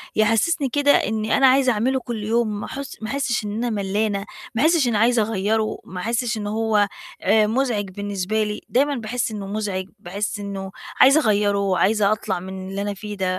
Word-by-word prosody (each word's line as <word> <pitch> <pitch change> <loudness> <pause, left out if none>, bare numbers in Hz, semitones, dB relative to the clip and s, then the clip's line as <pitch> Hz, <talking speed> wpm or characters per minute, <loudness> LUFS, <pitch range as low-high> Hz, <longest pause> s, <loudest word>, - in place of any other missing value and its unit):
يحسّسني 230 +8 +2
كده 285 +2 +3
إنّي 220 -3 +1
أنا 270 - +6
عايزة 260 -1 +4
أعمله 255 +5 +1
كل 235 -4 -5
يوم 220 -1 0
ما - - -5
أحس 275 0 -7
ما 220 - -5
أحسِّش 260 -5 -1
إن 205 - -3
أنا 235 +3 -1
ملّانة، 205 -1 -1 0.3
ما 225 - +1
أحسِّش 315 -3 +4
إن 235 - 0
عايزة 230 +2 +3
أغيّره، 215 +1 0
ما 185 - -8
أحسِّش 230 +1 -1
إنه 205 -1 -4
هو 215 -1 +2 0.3
آآ 210 +2 +4
مزعج 225 -4 0
بالنسبة 205 +2 -2
لي، 210 0 -4
دايمًا 280 +3 +2
باحس 235 0 -2
إنه 205 -2 -5
مزعج، 200 -2 -3
باحس 200 +3 -4
إنه 195 -1 -5 0.3
عايزة 275 +4 +7
أغيّره 205 -3 +2
وعايزة 200 +2 +2
أطلع 210 -4 -1
من 190 +1 -7
اللي 195 +1 -4
أنا 205 0 -2
فيه 205 +1 -7
ده، 190 -1 -1
215 Hz, 195 wpm, -22 LUFS, 200-240 Hz, 0.3 s, عايزة